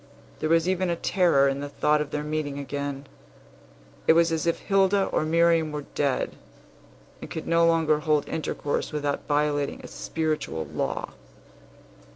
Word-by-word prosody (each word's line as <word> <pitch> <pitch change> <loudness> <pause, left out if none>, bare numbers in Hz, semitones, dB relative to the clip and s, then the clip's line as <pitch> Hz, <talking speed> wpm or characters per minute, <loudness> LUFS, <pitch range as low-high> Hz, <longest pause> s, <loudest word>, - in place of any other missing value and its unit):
There 155 - -1
was 165 +1 +3
even 185 -1 +1
a 170 - +1
terror 170 -6 +3
in 135 0 -1
the 145 0 -5
thought 150 +1 +2
of 150 - -3
their 150 0 -3
meeting 150 -2 -3
again. 140 0 -4 1.0
It - - +8
was 165 0 +4
as 160 +1 -1
if 170 - +2
Hilda 195 0 +2
or - - 0
Miriam 165 -1 +3
were 150 -1 -5
dead, 140 -3 -1 0.8
and - - -8
could 160 - -5
no 170 0 +3
longer 160 -2 +3
hold 150 -1 +1
intercourse 145 -2 -2
without 145 -2 -2
violating 145 -1 0
a - - -8
spiritual 155 - -3
law. - - -3
155 Hz, 160 wpm, -26 LUFS, 145-165 Hz, 1.0 s, It